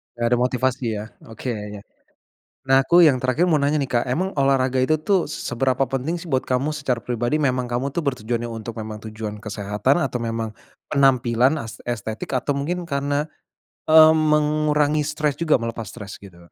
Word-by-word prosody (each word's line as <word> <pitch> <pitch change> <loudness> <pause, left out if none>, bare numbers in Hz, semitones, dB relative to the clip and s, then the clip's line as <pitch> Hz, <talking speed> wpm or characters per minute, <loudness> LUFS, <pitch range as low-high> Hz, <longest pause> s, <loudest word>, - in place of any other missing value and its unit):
Enggak 120 0 0
ada 120 - +3
motivasi, 125 +1 0
ya? 105 +1 -5 0.2
Oke, 115 +3 -5
ya 105 -2 -5
ya. - - -14 0.9
Nah, 135 0 +5
aku 175 +6 +5
yang 155 -6 +6
terakhir 130 +8 +1
mau 160 - +4
nanya 145 +1 +1
nih, 135 - -2
Kak, 120 -2 +1
emang 175 +9 -2
olahraga 135 -2 +2
itu 155 +3 +1
tuh, 190 +1 +2
seberapa 130 -2 -1
penting 135 +7 -2
sih 170 - -10
buat 130 -4 0
kamu 135 +4 -1
secara 130 -5 -1
pribadi? 120 +5 -1
Memang 130 -3 +1
kamu 120 +2 -2
tuh, 170 - -1
bertujuannya 120 -3 -2
untuk 115 0 -6
memang 110 -1 -6
tujuan 105 -1 -6
kesehatan? 105 - 0
Atau, 125 -2 -3
memang 115 -1 -3 0.4
penampilan 130 -1 +3
as 115 -6 -7
estetik, 110 +2 -3
atau 135 +3 0
mungkin 165 +6 -3
karena, 145 -1 -1 0.6
eee, 155 0 +8
mengurangi 150 -1 +2
stres 150 -2 -1
juga, 165 -2 +3
melepas 115 -1 -3
stres, 105 -4 -9
gitu? 85 -3 -16
130 Hz, 180 wpm, -22 LUFS, 115-150 Hz, 0.9 s, eee